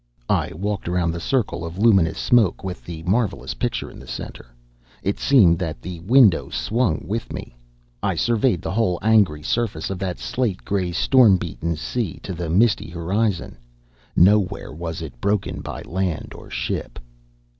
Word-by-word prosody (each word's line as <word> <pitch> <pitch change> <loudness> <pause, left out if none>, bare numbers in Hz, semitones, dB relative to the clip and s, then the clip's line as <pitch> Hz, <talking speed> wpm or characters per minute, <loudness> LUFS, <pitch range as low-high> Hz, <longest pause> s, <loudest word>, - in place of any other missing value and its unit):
I - - +1
walked 100 +3 -3
around 90 -2 +1
the 85 - -4
circle 120 - -1
of 85 +1 -6
luminous 95 -7 +4
smoke 115 -8 +3
with 95 -1 -5
the 80 -2 -7
marvelous 100 +2 0
picture 120 -2 -3
in - - -12
the - - -13
center. - - -7 0.6
It 100 - -1
seemed 95 -12 +5
that 80 -7 -3
the 90 +4 -7
window 105 0 +4
swung 110 -8 0
with 110 +4 -3
me. - - -7 0.5
I - - 0
surveyed 115 -5 +1
the - - -3
whole 95 -4 +1
angry 100 -9 +3
surface 100 -5 -1
of 95 - -4
that 95 -2 -3
slate 115 -7 -2
gray, 95 -3 -1
storm 110 +2 +5
beaten 85 -1 -3
sea, 100 +3 -3
to 95 - -4
the 85 -1 -4
misty 100 0 +2
horizon. 90 - -1 0.6
Nowhere 95 -2 +3
was 80 +1 -5
it 65 -6 -10
broken 100 -1 -1
by - - -6
land 90 -3 -3
or - - -12
ship. - - -3
95 Hz, 165 wpm, -22 LUFS, 85-110 Hz, 0.6 s, seemed